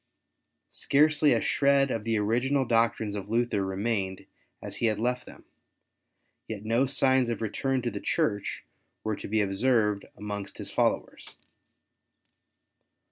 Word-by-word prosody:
Scarcely 150 +1 +3
a - - +3
shred 140 -1 +3
of 115 -1 -3
the 115 -1 +1
original 125 +6 +1
doctrines 115 -3 +1
of 100 -1 -6
Luther 115 -3 +1
remained 95 0 -2 0.3
as - - -7
he 115 - +1
had 110 -2 +1
left 125 +3 -1
them; - - -13 1.0
yet 110 -1 -6
no 115 +5 +2
signs 130 -2 +3
of 115 - -2
return 130 +4 -1
to 120 - -1
the 100 -1 -6
Church 100 -2 -1 0.4
were 110 -1 -1
to - - -8
be 110 +1 +1
observed 105 0 +1
amongst 105 -1 -6
his - - -6
followers. - - -1
115 Hz, 135 wpm, -28 LUFS, 105-130 Hz, 1.0 s, Scarcely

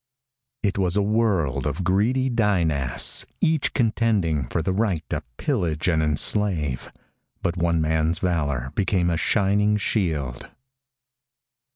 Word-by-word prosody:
_ - - +4
It 100 - -2
was 90 -1 +1
a 105 - +3
world 95 - 0
of 75 +6 -3
greedy 115 +9 +1
Dynasts 85 - +1 0.2
each 155 -2 +1
contending 105 - +1
for 80 - -1
the 95 - 0
right 95 -8 -1
to - - -1 0.2
pillage 90 - -1
and 80 -3 +2
enslave. 75 - 0 0.5
But 85 - 0
one 85 -2 +1
man's 80 +1 +1
valor 70 -8 -1
became 90 -3 +1
a 85 - 0
shining 105 +3 +2
shield. 80 - -2
90 Hz, 130 wpm, -23 LUFS, 80-105 Hz, 0.5 s, _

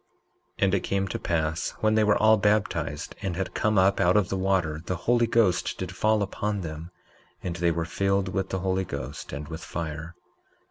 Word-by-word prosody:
19:13 - - 0
And 95 -1 +3
it 100 - +3
came 95 +1 -1
to - - -3
pass 80 0 -1
when 110 0 +3
they 110 0 +4
were 105 -1 +4
all 110 +1 +6
baptized 105 -7 0
and 95 -3 -2
had 95 +1 -3
come 110 -1 +1
up 95 +1 +4
out 90 +1 +4
of 100 -3 +2
the - - -1
water, 95 -5 0
the 90 - -2
Holy 120 -1 +3
Ghost 105 -6 +2
did 95 0 -5
fall 110 0 +2
upon 105 +1 -2
them, 80 0 -6 0.5
and 85 -2 -3
they 85 -1 +2
were 85 0 -1
filled 95 +2 0
with 95 -1 -2
the 95 - -2
Holy 95 0 0
Ghost 70 -7 -6
and 70 +2 -6
with 80 0 -7
fire. 80 +1 -5
95 Hz, 205 wpm, -26 LUFS, 85-100 Hz, 0.5 s, all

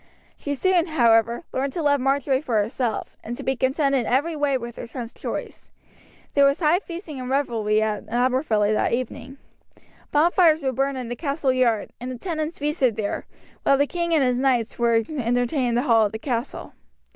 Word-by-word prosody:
She 285 0 -4
soon, 360 +3 +2
however, 235 -4 +3
learned 270 +1 -1
to 335 - -3
love 285 -1 +3
Marjory 270 0 +1
for 250 -7 -2
herself, 225 +2 -2
and 240 +2 -5
to - - -7
be 265 - 0
contented 265 0 +1
every 290 +6 +1
way 290 -2 +1
with 235 -1 -8
her - - -6
son's 235 -1 -7
choice. - - -6 0.6
There 280 - +4
was 275 0 +3
high 335 +1 +3
feasting 340 -6 -8
and 255 0 -5
revelry 225 -6 +1
at 215 -2 -3
Aberfilly 240 -3 +1
that 215 - +1
evening. 255 +2 -4 0.7
Bonfires 320 +1 +4
were 265 - +1
burned 270 +2 -1
in 250 -2 -5
the 240 - -3
castle 280 -2 -1
yard, 235 -4 +1
and 250 - -5
the 255 - -6
tenants 315 +1 -4
feasted 285 -6 0
there, 210 -2 -3 0.3
while 275 - +3
the 285 - +3
king 340 +2 -3
and 315 -4 +4
his 250 -1 +1
knights 245 -4 0
were 235 -1 +3
entertained 245 -1 0
in 235 - 0
the 245 - +1
hall 225 -5 +4
of 205 - -12
the - - -3
castle. 240 +1 -4
260 Hz, 190 wpm, -23 LUFS, 235-290 Hz, 0.7 s, There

